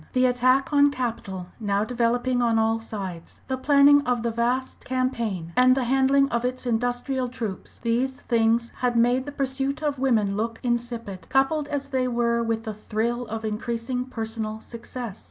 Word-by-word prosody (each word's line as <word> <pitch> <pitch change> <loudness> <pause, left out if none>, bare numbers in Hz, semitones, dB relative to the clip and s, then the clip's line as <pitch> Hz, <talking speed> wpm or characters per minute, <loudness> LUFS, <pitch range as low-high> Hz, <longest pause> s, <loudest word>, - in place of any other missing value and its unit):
The 255 -1 +3
attack 255 +3 +2
on 285 0 +6
capital 225 -8 -4
now 205 -2 0
developing 245 +2 +1
on 230 -2 +2
all 225 0 +2
sides, 195 -7 -7
the 260 - -1
planning 285 +2 +6
of 245 -2 +1
the 235 - 0
vast 245 +3 -1
campaign, 235 -10 -2
and 255 0 +6
the 265 - 0
handling 270 +2 +3
of 235 -1 -1
its 255 +1 -3
industrial 245 +2 -1
troops, 225 -6 -6
these 245 +3 +1
things 230 0 +1
had 245 -1 0
made 245 +3 +3
the - - -4
pursuit 275 +1 -2
of 290 -3 -1
women 220 -7 +2
look 225 +2 -2
insipid, 235 -5 -3
coupled 280 +3 +2
as 280 -1 -3
they 260 -2 0
were 235 -1 +1
with 225 -1 -1
the 220 -2 -4
thrill 230 +3 -2
of 220 0 -4
increasing 235 +3 -2
personal 220 -3 -4
success. 235 -1 -7
240 Hz, 170 wpm, -25 LUFS, 225-260 Hz, -, on